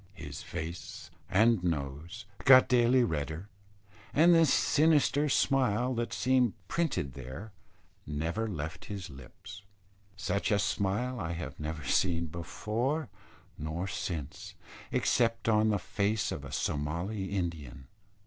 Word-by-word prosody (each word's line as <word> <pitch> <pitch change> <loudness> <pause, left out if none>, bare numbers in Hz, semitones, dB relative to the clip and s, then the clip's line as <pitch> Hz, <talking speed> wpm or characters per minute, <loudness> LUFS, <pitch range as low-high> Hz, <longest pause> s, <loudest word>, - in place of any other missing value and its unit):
His 70 -4 -7
face 85 0 -7 0.2
and 110 -1 +4
nose 80 +5 -3 0.2
got 130 -1 +8
daily 125 0 +4
redder; 80 0 -3 0.7
and 170 +4 +6
the 165 -1 +6
sinister 150 0 +3
smile 130 -3 +2
that 120 -1 -2
seemed 125 -3 +2
printed 150 - -1
there 65 - -8 0.6
never 80 +10 -2
left 80 -5 -5
his 100 -6 -6
lips. 90 +9 -12 0.6
Such 100 -1 -1
a 105 - +3
smile 105 +5 -1
I 85 -3 -3
have 85 +1 -6
never 80 0 -4
seen 85 +3 +1
before 110 - -2 0.5
nor 80 +4 -3
since, 80 -6 -5 0.4
except 115 -2 +1
on 110 -1 +4
the 105 - +2
face 100 +3 -1
of 70 - -5
a 70 - -8
Somali 85 +8 -2
Indian. 80 -9 -4
95 Hz, 120 wpm, -30 LUFS, 80-120 Hz, 0.7 s, got